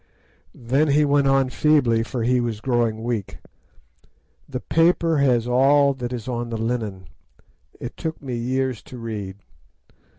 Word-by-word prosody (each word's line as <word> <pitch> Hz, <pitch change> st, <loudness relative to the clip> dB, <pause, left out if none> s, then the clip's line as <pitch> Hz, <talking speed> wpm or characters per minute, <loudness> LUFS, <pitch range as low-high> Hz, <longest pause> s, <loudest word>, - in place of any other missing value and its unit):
"Then 135 Hz, +6 st, +1 dB
he 150 Hz, +1 st, +3 dB
went 140 Hz, -1 st, +3 dB
on 135 Hz, -1 st, +2 dB
feebly, 130 Hz, -8 st, +3 dB
for 115 Hz, +1 st, -3 dB
he 125 Hz, +2 st, +2 dB
was 115 Hz, -3 st, -3 dB
growing 115 Hz, -2 st, 0 dB
weak: 115 Hz, -4 st, -3 dB, 1.1 s
'The 130 Hz, -2 st, -4 dB
paper 165 Hz, +1 st, +2 dB
has 125 Hz, -4 st, +2 dB
all 140 Hz, +3 st, +4 dB
that 125 Hz, -2 st, -5 dB
is 120 Hz, -2 st, -5 dB
on 120 Hz, -1 st, -3 dB
the 115 Hz, -, -3 dB
linen. 110 Hz, -5 st, -3 dB, 0.7 s
It 120 Hz, -, -7 dB
took 160 Hz, -1 st, -4 dB
me 130 Hz, -3 st, -5 dB
years 130 Hz, 0 st, -2 dB
to 125 Hz, -, -11 dB
read. 105 Hz, -5 st, -6 dB
125 Hz, 145 wpm, -22 LUFS, 115-140 Hz, 1.1 s, all